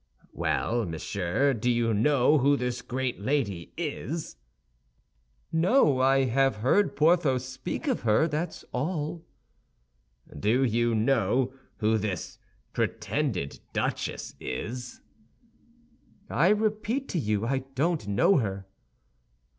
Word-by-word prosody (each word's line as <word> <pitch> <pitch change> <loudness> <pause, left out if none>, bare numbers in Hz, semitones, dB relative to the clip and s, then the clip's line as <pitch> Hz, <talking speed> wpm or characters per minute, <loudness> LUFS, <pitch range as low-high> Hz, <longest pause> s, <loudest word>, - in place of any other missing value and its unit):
"Well, 120 0 0
monsieur, 90 - 0
do 120 +1 -1
you 115 -1 +2
know 140 +6 +4
who 140 +2 +3
this 125 -1 -2
great 130 0 -3
lady 100 -8 -1
is?" 165 0 -4 1.2
"No; 165 - +3
I 135 +1 +4
have 135 0 +2
heard 130 - +2
Porthos 150 -6 +3
speak 130 - -5
of 260 - 0
her, 115 +8 +3
that's 160 +2 -4
all." 155 +4 -3 1.1
"Do 110 - +2
you 120 -1 +1
know 120 +2 +2 0.2
who 110 0 +2
this 100 -4 -4 0.3
pretended 115 - -2
duchess - - -2
is? 120 - -5 1.3
"I 165 - +3
repeat 215 +5 0
to 175 - -1
you, 105 -4 0
I 135 +3 +1 0.2
don't 155 - 0
know 100 - +4
her." 100 -6 -2
130 Hz, 110 wpm, -27 LUFS, 110-155 Hz, 1.3 s, know